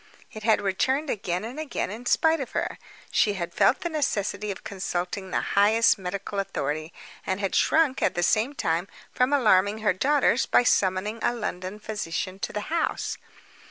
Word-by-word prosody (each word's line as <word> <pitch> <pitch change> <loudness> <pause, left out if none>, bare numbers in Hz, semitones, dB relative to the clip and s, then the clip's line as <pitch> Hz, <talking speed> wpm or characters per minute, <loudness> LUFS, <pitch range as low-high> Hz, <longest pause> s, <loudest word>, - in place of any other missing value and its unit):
It 215 - -8
had 220 -1 +3
returned 260 +9 0
again 180 -2 -2
and 250 +6 -7
again 305 -10 -3
in 235 +3 -7
spite 320 +4 +3
of 265 -3 -6
her. - - -2 0.3
She 210 - +3
had 175 -3 -4
felt - - +3
the 345 - -2
necessity 210 - -1
of 195 - -5
consulting 190 0 -4
the - - 0
highest 215 +2 +4
medical 195 +2 -4
authority; 155 -5 -3 0.3
and 190 +1 -2
had 195 -2 -2
shrunk, 310 -5 +3
at - - +1
the 175 - 0
same 225 +10 +2
time, 170 -2 -1 0.3
from 250 +2 +2
alarming 210 -7 +4
her 210 - +3
daughters 265 +4 +2
by - - +4
summoning 200 0 +1
a 240 - +1
London 185 -3 -4
physician 195 -3 -4
to - - -3
the 210 - -3
house. 335 - -1
205 Hz, 175 wpm, -26 LUFS, 185-245 Hz, 0.3 s, highest